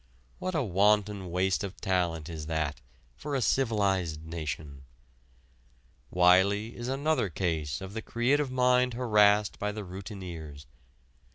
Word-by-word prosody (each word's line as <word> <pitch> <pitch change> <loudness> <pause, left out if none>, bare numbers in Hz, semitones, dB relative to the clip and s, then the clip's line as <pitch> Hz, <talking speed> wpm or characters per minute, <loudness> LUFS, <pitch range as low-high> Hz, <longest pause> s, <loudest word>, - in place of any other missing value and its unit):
What 185 -1 -3
a 155 - +1
wanton 100 -1 +2
waste 90 +3 0
of 100 -1 -6
talent 85 -4 -1
is 80 -2 -6
that 80 -2 -2 0.3
for 145 - -4
a - - +1
civilized 100 - 0
nation! 80 -4 -5 1.3
Wiley 95 +5 +3
is 120 0 -6
another 135 -4 0
case 80 -4 -2
of 95 +1 -7
the 110 - -4
creative 130 +6 +1
mind 125 -1 +2
harassed 105 -4 +3
by 105 0 -1
the 105 0 -6
routineers. 90 -6 -8
100 Hz, 125 wpm, -29 LUFS, 85-115 Hz, 1.3 s, Wiley